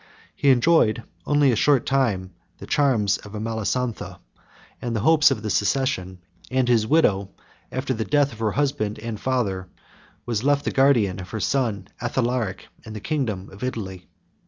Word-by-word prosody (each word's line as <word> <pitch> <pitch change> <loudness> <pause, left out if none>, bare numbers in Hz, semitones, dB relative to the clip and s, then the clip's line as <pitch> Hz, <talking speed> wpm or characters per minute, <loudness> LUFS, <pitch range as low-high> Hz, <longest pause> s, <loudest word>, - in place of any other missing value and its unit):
He 140 - +1
enjoyed 120 -4 +4 0.2
only 145 -2 +4
a - - +1
short 135 +2 +3
time 105 -9 0 0.2
the - - -9
charms 115 -9 +2
of 105 - -12
Amalasontha, 115 +2 -3 0.6
and 120 -2 -3
the 110 - -1
hopes 155 +4 +5
of 105 - -2
the 105 - -2
succession; 100 -4 0 0.3
and 130 -1 +1
his 115 -3 +3
widow, 100 -11 +2 0.4
after 130 +1 -2
the 110 -2 -2
death 145 0 +2
of 110 - -13
her 110 -2 0
husband 135 -7 -1
and 110 -1 -6
father, 100 -9 -1 0.6
was 115 -2 -2
left 145 +1 +2
the - - 0
guardian 120 -9 +3
of 90 0 -8
her 110 - -4
son 110 -6 -1
Athalaric, 120 -4 -1 0.2
and 110 - -9
the - - -5
kingdom 110 -8 -3
of 100 - -11
Italy. 95 -8 -5
115 Hz, 165 wpm, -23 LUFS, 105-135 Hz, 0.6 s, hopes